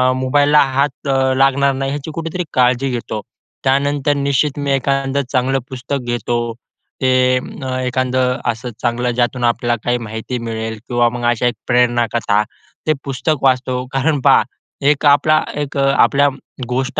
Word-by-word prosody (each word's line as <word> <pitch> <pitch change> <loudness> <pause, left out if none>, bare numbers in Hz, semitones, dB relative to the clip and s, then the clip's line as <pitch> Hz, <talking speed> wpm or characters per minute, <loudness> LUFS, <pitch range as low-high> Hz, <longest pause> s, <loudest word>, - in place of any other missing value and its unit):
मोबाईलला 145 +3 +3 0.2
हात 140 0 -1 0.3
लागणार 135 +1 +3
नाही, 135 0 -2
याची 145 +2 -5
कुठेतरी 165 +2 -3
काळजी 125 +1 +2
घेतो. 115 -3 -4 0.4
त्यानंतर 140 +1 +1
निश्चित 140 0 0
मी 140 -1 -1
एखादं 135 0 0
चांगलं 135 0 +1
पुस्तक 130 +2 -3
घेतो 120 0 -1 0.6
ते 130 - +2 0.6
अ, 130 -1 -2
एखादं 130 0 0
असं 120 +2 -7
चांगलं 120 +1 0
ज्यातून 120 +1 -1
आपल्याला 120 0 +1
काही 120 0 +1
माहिती 110 +2 -5
मिळेल 110 0 -4
किंवा 120 -1 +2
मग 120 0 -5
अशा 120 +1 +1
एक 120 - -1
प्रेरण 120 -1 +3
कथा. 105 -3 +2 0.4
ते 155 - +4
पुस्तक 140 +2 -2
वाचतो, 130 -1 +1
कारण 145 +2 +1
पहा - - +5 0.5
एक 150 0 +1
आपला 145 +2 +4
एक 145 0 -4
आपल्या 140 +1 +3 0.4
गोष्ट 130 +4 -1
130 Hz, 145 wpm, -17 LUFS, 120-140 Hz, 0.6 s, पहा